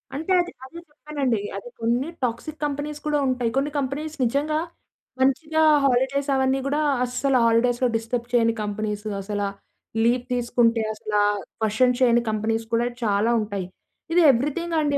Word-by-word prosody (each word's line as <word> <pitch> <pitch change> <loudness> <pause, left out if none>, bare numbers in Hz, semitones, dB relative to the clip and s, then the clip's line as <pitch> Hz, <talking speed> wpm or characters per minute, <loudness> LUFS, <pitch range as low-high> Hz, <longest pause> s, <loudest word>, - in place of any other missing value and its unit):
అంటే 320 +6 -3
అది, 350 +1 -5
అదే 335 +6 -10
చెప్పానండి. 290 -6 -2 0.2
అది 200 - -8
కొన్ని 240 +5 +1 0.2
టాక్సిక్ 250 +6 -3
కంపెనీస్ 290 +1 -4
కూడా 300 -1 +2
ఉంటాయి. 250 -3 0
కొన్ని 280 +2 0
కంపెనీస్ 290 +3 -3
నిజంగా 290 +5 0 0.6
మంచిగా 305 +4 +2 0.2
హాలిడేస్ 270 +2 +1
అవన్నీ 265 0 +2
గూడా 295 +2 0 0.2
అస్సలు 255 +2 +1
హాలిడేస్‌లొ 240 +2 +3
డిస్టర్బ్ 230 +1 -2
చేయని 230 -1 +3
కంపెనీస్ 210 0 -3 0.2
అసల 205 +1 -3 0.6
లీవ్ 240 +1 +2
తీసుకుంటే 235 -1 +2
అసల 215 0 -8 0.5
క్వెషన్ 240 +3 +2
చేయని 240 -2 +4
కంపెనీస్ 220 +1 -1
కూడా 230 +1 +2 0.2
చాలా 210 +1 +2
ఉంటాయి. 205 -3 -3 0.5
ఇది 350 - +5
ఎవ్రీథింగ్ 300 +7 -1
అండి. 290 -1 +1
250 Hz, 140 wpm, -24 LUFS, 230-285 Hz, 0.6 s, ఇది